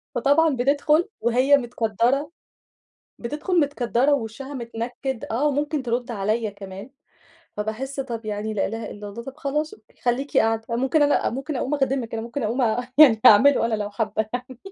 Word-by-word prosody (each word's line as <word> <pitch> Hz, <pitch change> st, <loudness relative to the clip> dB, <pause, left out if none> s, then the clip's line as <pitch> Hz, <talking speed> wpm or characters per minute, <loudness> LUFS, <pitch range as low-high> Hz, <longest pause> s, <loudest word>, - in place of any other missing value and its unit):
فطبعًا 285 Hz, +4 st, +3 dB
بتدخُل 285 Hz, +6 st, +2 dB
وهي 255 Hz, +5 st, +4 dB
متكدَّرة، 245 Hz, -, 0 dB, 0.9 s
بتدخُل 305 Hz, +8 st, -1 dB
متكدَّرة 280 Hz, -1 st, +1 dB
ووشها 265 Hz, +3 st, -4 dB
متنكِّد، 240 Hz, +1 st, -5 dB
آه، 270 Hz, +7 st, +1 dB
وممكن 290 Hz, 0 st, -1 dB
ترد 240 Hz, +1 st, -2 dB
عليا 215 Hz, +1 st, -1 dB
كمان، 195 Hz, +2 st, -10 dB, 0.7 s
فباحس 240 Hz, +6 st, -4 dB
طب 235 Hz, -4 st, -5 dB
يعني 215 Hz, +1 st, -3 dB
لا 195 Hz, -, 0 dB
إله 225 Hz, +2 st, -5 dB
إلا 205 Hz, 0 st, -8 dB
الله، 235 Hz, +4 st, -8 dB
طب 270 Hz, +3 st, -9 dB
خلاص 300 Hz, +2 st, -2 dB
أوكي 215 Hz, -, -27 dB
خليكِ 255 Hz, +4 st, -1 dB
قاعدة، 225 Hz, 0 st, +2 dB
آآ، 230 Hz, -, 0 dB
ممكن 270 Hz, +5 st, +2 dB
أنا 290 Hz, 0 st, +2 dB
ممكن 270 Hz, +4 st, -4 dB
أقوم 275 Hz, +4 st, -1 dB
أخدمِك 270 Hz, -4 st, -1 dB
أنا 225 Hz, -, -3 dB
ممكن 235 Hz, +3 st, -5 dB
أقوم 235 Hz, +5 st, 0 dB, 0.4 s
يعني 240 Hz, -8 st, +8 dB
أعمله 230 Hz, +3 st, +7 dB
أنا، 225 Hz, -, -1 dB
لو 210 Hz, -1 st, -3 dB
حابة 215 Hz, 0 st, -2 dB
يعني. 250 Hz, 0 st, -6 dB
245 Hz, 165 wpm, -23 LUFS, 225-280 Hz, 0.9 s, يعني